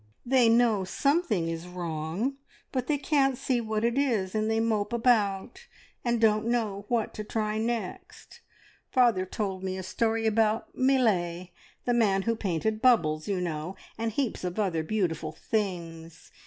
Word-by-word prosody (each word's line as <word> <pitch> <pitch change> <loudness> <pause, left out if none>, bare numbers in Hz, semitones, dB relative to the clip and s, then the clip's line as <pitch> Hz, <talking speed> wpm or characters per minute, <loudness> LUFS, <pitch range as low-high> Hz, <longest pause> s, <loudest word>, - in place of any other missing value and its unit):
They 250 -2 +4
know 230 -4 +4
something 240 - +1
is 165 +1 -4
wrong, 175 - -3 0.3
but 255 -2 -2
they 300 - +2
can't 270 -2 +2
see 255 -2 0
what 220 -1 -2
it 235 +3 +1
is, 220 -10 0
and 215 0 0
they 225 0 +1
mope 225 -1 0
about, 230 - +1 0.4
and 235 -1 +1
don't 215 0 +3
know 215 -4 -1
what 235 -3 0
to 215 - -5
try 215 0 -2
next. 225 -4 -5 0.5
Father 235 -7 +3
told 190 -2 -3
me 190 0 -3
a 190 - -5
story 225 +4 0
about 220 0 +1
Millais, 185 -10 +1 0.3
the 245 - +2
man 200 -5 +2
who 230 +2 +1
painted 215 +2 -1
`Bubbles,' 155 -12 +3
you 195 -3 0
know, 170 +1 -3 0.2
and 225 0 -2
heaps 245 -3 -2
of 180 +1 -3
other 185 -7 0
beautiful 160 -4 -2
things. 170 -4 -4
215 Hz, 155 wpm, -28 LUFS, 185-235 Hz, 0.5 s, They